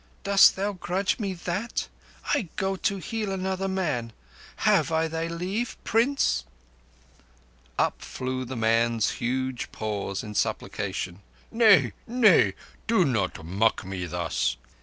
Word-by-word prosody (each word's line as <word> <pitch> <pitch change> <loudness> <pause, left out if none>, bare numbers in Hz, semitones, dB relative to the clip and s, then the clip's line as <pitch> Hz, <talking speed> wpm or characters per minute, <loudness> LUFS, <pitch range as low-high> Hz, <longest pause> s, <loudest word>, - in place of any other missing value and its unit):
Dost 200 0 +6
thou 200 +2 -1
grudge 185 +3 -1
me 195 -3 -2
that? 185 +7 -3 0.5
I 245 - 0
go 195 -1 -1
to 200 +1 -1
heal 210 +3 -3
another 190 0 -2
man. 150 -12 -2 0.4
Have - - +2
I 160 0 +2
thy 165 +1 -3
leave—Prince?" 225 +8 0 1.3
Up - - 0
flew 130 0 -4
the 130 +1 -6
man's 115 -1 +2
huge 130 +1 -2
paws 100 -2 -3
in 105 - -7
supplication. 95 -2 -2 0.3
"Nay—nay. 200 - +4 0.3
Do 225 -6 +4
not 100 - -1
mock 100 +4 +1
me 95 -2 -4
thus." 80 -8 -1
165 Hz, 115 wpm, -26 LUFS, -, 1.3 s, Dost